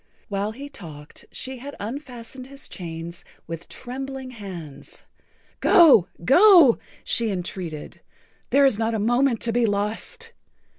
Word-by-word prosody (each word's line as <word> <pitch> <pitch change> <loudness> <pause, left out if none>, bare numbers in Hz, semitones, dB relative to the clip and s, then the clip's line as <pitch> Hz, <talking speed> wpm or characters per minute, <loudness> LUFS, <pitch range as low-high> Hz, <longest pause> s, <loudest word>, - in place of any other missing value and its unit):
While 205 +1 -2
he 275 +5 -8
talked 155 - -11
she 260 0 -6
had 285 +3 -8
unfastened 250 +1 -7
his 275 +1 -11
chains 170 -1 -7 0.2
with 165 0 -7
trembling 265 +1 -7
hands. 185 - -10 0.6
"Go! 280 - +7 0.2
Go!" 345 - +7 0.2
she 230 -2 0
entreated. 180 -5 -5 0.5
"There 280 0 +5
is 260 -6 +2
not 225 0 0
a - - +1
moment 240 +3 +2
to 230 - -1
be 240 -1 +3
lost. 220 - -3
230 Hz, 130 wpm, -24 LUFS, 195-270 Hz, 0.6 s, Go